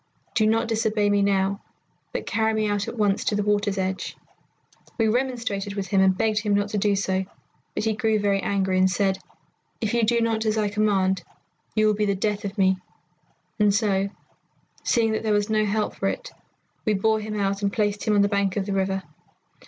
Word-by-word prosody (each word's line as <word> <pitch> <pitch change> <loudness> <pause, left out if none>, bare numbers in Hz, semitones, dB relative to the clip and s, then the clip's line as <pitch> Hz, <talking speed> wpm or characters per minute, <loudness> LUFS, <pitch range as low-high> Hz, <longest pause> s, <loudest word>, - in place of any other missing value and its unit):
Do 220 -3 +3
not 225 +1 +2
disobey 215 -2 +1
me 205 0 +3
now, 200 0 +1 0.5
but - - -4
carry 220 0 +1
me 215 -1 +1
out 205 -1 -1
at - - -6
once 205 -2 +1
to 210 - +1
the 205 - 0
water's 205 -1 +1
edge.' 190 0 -3 0.8
"We 225 -2 +2
remonstrated 230 -5 -1
with 195 -2 -4
him 195 0 +3
and 190 -1 +4
begged 215 0 +1
him 210 -1 +1
not 205 0 0
to 210 - -1
do 205 0 +2
so, 190 -1 0 0.5
but - - -1
he 220 0 +1
grew 220 0 +1
very 200 -1 +1
angry, 190 -1 0
and 185 0 +4
said, 190 0 +1 0.6
'If 220 -1 -1
you 235 - +2
do 235 +1 +2
not 225 -1 +1
as 215 0 +1
I 210 -1 +1
command, 195 -3 +1 0.5
you 215 0 +3
will 215 - +4
be 210 0 0
the 200 - +1
death 210 +2 -1
of 200 +2 -5
me'; 190 -1 +3 0.8
and 210 -1 +5
so, 200 -1 +1 0.7
seeing 225 -3 +2
that 220 - -1
there 220 -1 +1
was 205 +1 +1
no 215 0 +2
help 210 +1 -1
for - - -2
it, - - -3 0.5
we 215 - +1
bore 220 +2 +2
him 215 0 -4
out 195 0 0
and 200 -1 +1
placed 205 -1 -1
him 215 - +2
on 200 - +5
the - - +3
bank 200 -1 0
of 195 - 0
the 200 - -2
river. 190 0 0
205 Hz, 215 wpm, -24 LUFS, 195-220 Hz, 0.8 s, and